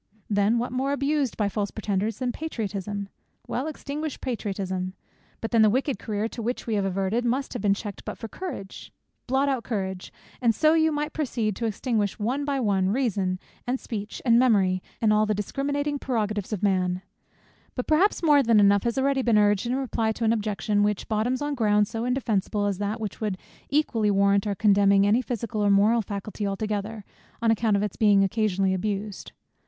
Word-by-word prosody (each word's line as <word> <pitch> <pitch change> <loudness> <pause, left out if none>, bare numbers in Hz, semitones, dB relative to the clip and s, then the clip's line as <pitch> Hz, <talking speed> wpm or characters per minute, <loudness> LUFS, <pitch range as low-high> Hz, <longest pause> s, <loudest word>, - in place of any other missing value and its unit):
Then 205 +3 +3
what 240 +1 -2
more 265 +2 0
abused 285 -2 0
by 210 - +1
false 205 0 -2
pretenders, 210 0 -2
than 250 -2 -1
Patriotism? 205 - -4 0.4
Well, 260 +5 -3
extinguish 300 -1 -5
Patriotism. 190 -6 -3 0.5
But 225 - -4
then 230 - +4
the 215 - +6
wicked 265 +4 0
career 215 0 -2
to 235 - -7
which 240 +3 -3
we 230 - -2
have 200 -2 +1
adverted, 195 +5 0
must 255 +3 -1
have 245 - -4
been 200 -1 +3
checked 205 -1 -7
but - - -6
for 225 - -6
Courage. 220 - -7 0.4
Blot 265 +2 +2
out 265 -4 0
Courage 190 -5 -4 0.3
and 230 -3 +3
so 310 - +4 0.2
might 295 0 -1
you 300 - -3
proceed 235 -9 -1
to 230 - -2
extinguish 215 -1 -1
one 255 +7 -1
by 280 -1 0
one, 195 -5 +1
Reason, 200 -6 0 0.3
and 255 +1 0
Speech, 210 -2 -6
and 235 -1 +5
Memory, 195 -7 +3 0.2
and 215 -1 +5
all 215 0 +3
the 215 - +1
discriminating 285 +7 -2
prerogatives 215 -6 -2
of 210 -2 -3
man. 185 -2 +1 0.7
But 250 - -2
perhaps 350 +5 +2
more 295 -3 +6
than 230 -4 +4
enough 200 0 +5
has 235 -1 0
been 265 - +1
already 275 -1 +1
urged 205 +1 +3
in 245 - 0
reply 230 -4 -1
to 230 - -5
an 225 0 +3
objection, 210 -1 0
which 205 -1 0
bottoms 235 +5 0
on 290 0 -1
ground 210 -5 +2
so 225 +2 -4
indefensible, 220 -5 0
as 200 -2 -1
that 205 +2 -2
which 215 -1 -5
would 210 -4 -1 0.3
equally 250 -7 +1
warrant 200 0 +3
our 200 - -1
condemning 200 -1 +4
any 215 +5 +3
physical 230 -3 -3
or 205 - +3
moral 210 +4 +4
faculty 205 0 -4
altogether, 210 +1 -3 0.3
on 230 -1 +3
account 220 -2 +2
of 200 - 0
its 210 - -3
being 205 -2 +5
occasionally 195 -2 +1
abused. 200 +1 -3
215 Hz, 190 wpm, -26 LUFS, 200-250 Hz, 0.7 s, the